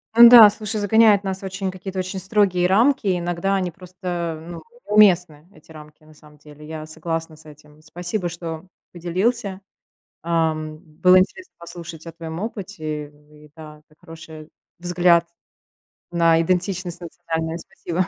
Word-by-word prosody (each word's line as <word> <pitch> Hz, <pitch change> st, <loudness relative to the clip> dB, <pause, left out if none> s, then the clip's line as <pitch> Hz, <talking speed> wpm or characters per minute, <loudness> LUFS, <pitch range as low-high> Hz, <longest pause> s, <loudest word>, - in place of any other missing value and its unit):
Н-да, 235 Hz, -2 st, +10 dB
слушай, 215 Hz, +1 st, -5 dB
загоняет 210 Hz, 0 st, +4 dB
нас 190 Hz, -1 st, -4 dB
в -, -, -15 dB
очень, 190 Hz, 0 st, -4 dB
какие-то 190 Hz, 0 st, -7 dB
очень 185 Hz, +1 st, -4 dB
строгие 190 Hz, -2 st, +1 dB
рамки. 225 Hz, +3 st, +2 dB
И 180 Hz, -2 st, +1 dB
иногда 175 Hz, +3 st, -1 dB
они 185 Hz, -2 st, -2 dB
просто, 175 Hz, -2 st, -6 dB
ну, 170 Hz, -, -9 dB, 0.2 s
неуместны 180 Hz, -7 st, +3 dB
эти 160 Hz, -3 st, -19 dB
рамки, 150 Hz, 0 st, -14 dB
на 155 Hz, 0 st, -18 dB
самом 150 Hz, 0 st, -19 dB
деле. 150 Hz, +1 st, -15 dB
Я 155 Hz, -1 st, -7 dB
согласна 165 Hz, 0 st, -5 dB
с 155 Hz, +1 st, -19 dB
этим. 150 Hz, 0 st, -17 dB
Спасибо, 175 Hz, +4 st, -4 dB
что 165 Hz, -1 st, -7 dB, 0.3 s
поделился. 190 Hz, +4 st, -2 dB, 0.6 s
Ам, 160 Hz, -2 st, -1 dB
было 180 Hz, +3 st, +3 dB
интересно 365 Hz, -, -3 dB
послушать 170 Hz, -1 st, -8 dB
о 165 Hz, -, -8 dB
твоем 165 Hz, 0 st, -8 dB
опыте. 180 Hz, -8 st, -6 dB, 0.2 s
И, 150 Hz, 0 st, -18 dB
да, 155 Hz, -1 st, -12 dB
это 155 Hz, -, -26 dB
хороший 160 Hz, -2 st, -12 dB, 0.3 s
взгляд 175 Hz, -1 st, +2 dB, 0.9 s
на 165 Hz, -1 st, +3 dB
идентичность 180 Hz, 0 st, -2 dB
национальную. 165 Hz, -1 st, -4 dB
Спасибо, 175 Hz, +3 st, -4 dB
175 Hz, 145 wpm, -21 LUFS, 160-190 Hz, 0.9 s, Н-да